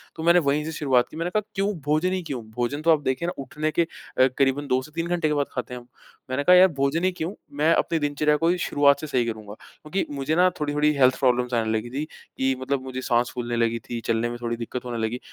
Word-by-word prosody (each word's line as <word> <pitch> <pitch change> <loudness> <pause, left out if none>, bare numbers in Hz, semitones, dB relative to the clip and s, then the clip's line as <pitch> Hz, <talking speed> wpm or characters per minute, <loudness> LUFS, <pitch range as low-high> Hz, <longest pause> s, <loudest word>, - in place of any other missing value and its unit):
तो 160 - -6
मैंने 170 +1 +6
वहीं 145 -1 +1
से 160 - -4
शुरुआत 135 -6 +1
की। - - -10
मैंने 165 +2 -2
कहा 215 - +3
क्यों 200 +2 0
भोजन 155 +5 +1
ही 185 - -1
क्यों? 135 -8 -5
भोजन 125 +6 -2
तो 165 - +4
आप 150 - 0
देखें 130 +4 -1
ना, 175 - -2
उठने 150 +3 -3
के 170 - +3 0.3
क़रीबन 135 +2 +3
अ, - - -9
2 130 -1 +2
से 155 - -12
3 165 0 -2
घंटे 175 -2 0
के 150 - +1
बाद 145 -1 +1
खाते 125 -1 -5
हैं 125 - -6
हम। 120 - -20 0.4
मैंने 130 +2 -1
कहा, 180 +3 +7
"यार, 185 +1 +8
भोजन 140 +4 0
ही 185 - +3
क्यों? 175 +1 -4 0.2
मैं 155 +3 +4
अपने 165 - +1
दिनचर्या 150 +1 +1
को 165 - +1
ही 180 - 0
शुरुआत 140 -2 +3
से 155 - -6
सही 125 -4 +1
करूँगा।" 110 -3 -6
क्योंकि 155 - -5
मुझे 140 +3 -1
ना 180 +2 +5
थोड़ी-थोड़ी 150 0 +1
हेल्थ 130 -1 +4
प्रॉब्लम्स 125 -2 +1
आने 115 -2 +1
लगी 110 +2 -2
थीं 140 +5 -3
कि 130 -3 -3
मतलब 130 0 -1
मुझे 130 0 -5
साँस 120 -1 +1
फूलने 120 -1 -3
लगी 115 0 +1
थी, 115 +1 -6
चलने 115 +1 +1
में 120 - -5
थोड़ी 120 0 -2
दिक़्क़त 120 +2 -5
होने 120 -1 -4
लगी। 120 +3 -3
140 Hz, 260 wpm, -24 LUFS, 125-155 Hz, 0.4 s, यार